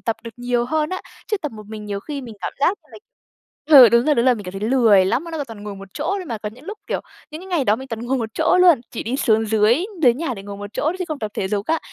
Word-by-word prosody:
tập 225 - -2
được 230 - -6
nhiều 245 0 0
hơn 305 +4 -1
á. 370 - -3 0.3
Chứ 425 - +1
tập 300 -7 -5
một 215 -2 -11
mình 215 -1 -8
nhiều 200 -1 -4
khi 285 +4 -6
mình 230 -3 -9
cảm - - -4
giác 370 +7 +2
như - - -28
là - - -10 0.8
ừ, 245 - +11
đúng 235 +2 +3
rồi, 300 - +4
đúng 235 -1 +2
rồi, 255 - +5
mình 205 -3 -8
cảm 180 - -7
thấy 195 - -6
lười 220 -8 +5
lắm. 255 - 0
Nó 335 - -8
nó 310 -3 -3
toàn 225 -4 -11
ngồi 205 -1 -6
một 195 0 -11
chỗ 295 - -4
thôi 370 - -6
mà, 230 -6 -4
có 210 0 -5
những 250 +6 -16
lúc, 420 +4 -7
kiểu, - - -2 0.3
những 310 - -8
cái - - -11
ngày 345 -7 0
đó 210 -2 +3
mình 265 +2 -9
toàn 225 -2 -5
ngồi 265 +1 0
một 225 -1 -3
chỗ 325 +3 +3
luôn, 345 -9 +6
chỉ 230 - -5
đi 245 +4 -2
xuống 225 -5 +2
dưới 220 - +3 0.2
dưới 245 -4 +6
nhà 270 -2 -3
để 195 - -9
ngồi 200 0 -8
một 205 0 -7
chỗ - - -2
thôi 315 +4 +1
chứ 365 - -2
không 305 -2 -4
tập 215 -1 -4
thể 190 - -2
dục 205 +1 -2
á. 325 0 +1
240 Hz, 325 wpm, -21 LUFS, 215-300 Hz, 0.8 s, ừ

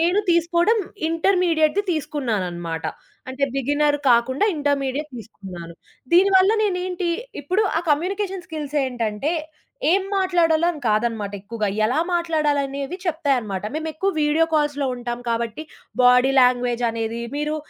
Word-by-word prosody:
నేను 350 +5 +2
తీసుకోవడం 340 +6 +3 0.3
ఇంటర్మీడియేట్‌ది 335 0 +2
తీసుకున్నాననమాట. 205 - -3 0.5
అంటే, 270 +2 0
బిగినరు 290 +2 +1
కాకుండా 250 - +3
ఇంటర్మీడియేట్ 285 0 -1
తీసుకున్నాను. 185 -6 -10 0.4
దీనివల్ల 380 +2 +5
నేనేంటి 360 -2 -2 0.3
ఇప్పుడు 370 +9 +1
ఆ - - -1
కమ్యూనికేషన్ 375 +3 -1
స్కిల్స్ 300 -2 -5
ఏంటంటే, 240 +4 -2 0.6
ఏం 385 +2 +3
మాట్లాడాలో 340 -3 +2
అని 300 - -9
కాదనమాట 215 -2 0
ఎక్కువగా. 215 +1 -3 0.2
ఎలా 245 +6 +1
మాట్లాడాలనేవి 295 -3 -1
చెప్తాయనమాట. 265 - -1
మేమెక్కువ 320 +5 -2
వీడియో 300 +2 +3
కాల్స్‌లో 295 -2 +1
ఉంటాం 240 0 -4
కాబట్టి 230 +4 -2 0.4
బాడీ 250 +2 +5
లాంగ్వేజ్ 245 -1 +2
అనేది, 230 +1 -3 0.2
మీరు 300 +1 -1
290 Hz, 110 wpm, -22 LUFS, 240-340 Hz, 0.6 s, దీనివల్ల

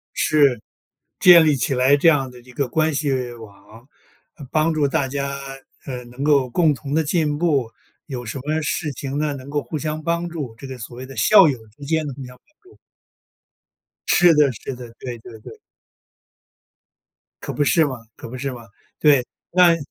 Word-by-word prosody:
是， 140 -7 +3 0.6
建 175 -3 +8
立 150 -2 +3
起 135 +1 -1
来 130 +3 +4
这 165 - +3
样 135 -4 +1
的 125 - -14
一 125 +1 -16
个 135 +2 -2
关 155 +4 0
系 145 -1 -1 0.2
网， 110 +2 -15 0.6
帮 160 +1 +2
助 150 -2 +1
大 135 0 0
家， 140 +1 -3 0.5
呃， 125 -2 -6
能 125 +3 -7
够 140 -4 +3
共 155 +2 +3
同 140 +1 -6
地 160 - +2
进 150 -1 0
步。 140 -9 0 0.4
有 125 -4 -6
什 115 +5 -5
么 155 +3 -1
事 155 +1 -2
情 135 +2 -5
呢， 150 -1 -1
能 135 0 -9
够 145 0 -1
互 155 - -5
相 155 +1 -4
帮 170 +2 -1
助， 145 -9 -6
这 - - -10
个 130 -1 -7
所 120 0 -9
谓 130 +1 -8
的 135 - -11
校 195 -6 +7
友 130 -4 -3 0.2
之 145 - -13
间 160 0 0
的 140 - -5
互 135 +1 -9
相 125 0 -13
帮 305 - -38 0.2
助。 - - -21 1.3
是 175 -1 +5
的 150 -2 +4
是 125 +4 -7
的， 120 -1 -10
对 125 -2 -6
对 115 0 -12
对。 445 - -12 1.8
可 - - -5
不 145 - +1
是 160 +2 +3
嘛 130 -3 -4 0.2
可 - - -10
不 130 - -7
是 135 +2 -3
嘛， 120 -2 -11 0.3
对， 140 -5 +4 0.3
那 175 -2 +5
140 Hz, 205 characters per minute, -21 LUFS, 125-155 Hz, 1.8 s, 建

